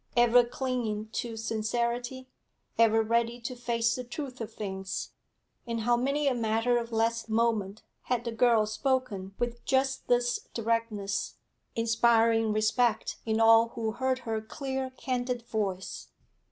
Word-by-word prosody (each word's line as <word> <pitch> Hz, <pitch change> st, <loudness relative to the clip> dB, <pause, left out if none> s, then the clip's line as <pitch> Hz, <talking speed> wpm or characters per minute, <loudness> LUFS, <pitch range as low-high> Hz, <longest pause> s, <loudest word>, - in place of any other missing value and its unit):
Ever 240 Hz, 0 st, +6 dB
clinging 240 Hz, -4 st, -3 dB
to 230 Hz, 0 st, -4 dB
sincerity, 235 Hz, +3 st, -2 dB, 0.5 s
ever 225 Hz, -1 st, +4 dB
ready 235 Hz, +2 st, +1 dB
to 250 Hz, +2 st, -5 dB
face 235 Hz, -1 st, 0 dB
the 250 Hz, -, -4 dB
truth 255 Hz, -1 st, -6 dB
of 225 Hz, 0 st, -5 dB
things, 190 Hz, -3 st, -5 dB, 0.6 s
in 230 Hz, 0 st, -2 dB
how 240 Hz, +2 st, +2 dB
many 275 Hz, +4 st, 0 dB
a 270 Hz, -, +3 dB
matter 230 Hz, +1 st, +1 dB
of 235 Hz, 0 st, -6 dB
less 230 Hz, 0 st, 0 dB
moment 220 Hz, -3 st, 0 dB, 0.2 s
had 245 Hz, -1 st, -1 dB
the 235 Hz, -, -2 dB
girl 230 Hz, -1 st, +4 dB
spoken 215 Hz, -4 st, -2 dB
with 240 Hz, 0 st, -3 dB
just 265 Hz, 0 st, 0 dB
this 245 Hz, 0 st, +1 dB
directness, 230 Hz, -3 st, -1 dB, 0.4 s
inspiring 230 Hz, -1 st, +3 dB
respect 215 Hz, +2 st, +1 dB
in 220 Hz, 0 st, +1 dB
all 225 Hz, 0 st, +7 dB
who 225 Hz, -1 st, -1 dB
heard 260 Hz, +3 st, 0 dB
her 220 Hz, -1 st, -1 dB
clear, 265 Hz, +3 st, -4 dB
candid 250 Hz, -2 st, -3 dB
voice. 200 Hz, -5 st, -3 dB
230 Hz, 140 wpm, -29 LUFS, 220-245 Hz, 0.6 s, all